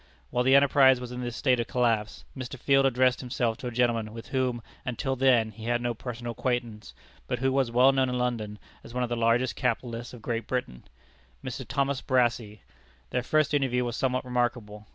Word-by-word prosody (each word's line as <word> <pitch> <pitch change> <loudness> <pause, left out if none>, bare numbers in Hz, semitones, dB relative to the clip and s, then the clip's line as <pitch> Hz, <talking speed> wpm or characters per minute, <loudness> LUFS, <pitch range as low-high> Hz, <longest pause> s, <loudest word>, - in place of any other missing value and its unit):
While 125 0 +1
the 130 +2 +5
enterprise 135 -2 +6
was 125 -1 -7
in 125 0 -5
this 120 -1 -4
state 130 -3 +2
of 115 - -1
collapse, 115 -4 0
Mr. 130 0 -6
Field 135 +1 +3
addressed 130 -1 +2
himself 120 -2 -1
to 125 - -5
a - - -3
gentleman 115 -2 0
with 115 - -9
whom, 125 -3 -1 0.2
until 130 +1 -2
then, 125 -4 +3
he 110 +1 -10
had 120 0 +1
no 120 0 -1
personal 120 +1 -6
acquaintance, 120 -2 -3 0.3
but - - -1
who 135 +2 +1
was 135 -2 +1
well 125 +3 +5
known 135 -1 +1
in 125 - -1
London 115 -4 -2 0.3
as 115 - -12
one 125 - 0
of 120 - -2
the 120 - -1
largest 115 +2 +2
capitalists 120 -1 -2
of 120 -3 -12
Great 115 -1 -3
Britain 95 - -4 0.6
Mr. - - -5
Thomas 140 -1 0
Brassey. 120 -5 0 0.5
Their 125 - 0
first 155 +3 +1
interview 130 -3 +1
was 120 -1 -3
somewhat 130 -1 -1
remarkable. 120 -4 -2
125 Hz, 200 wpm, -27 LUFS, 115-130 Hz, 0.6 s, enterprise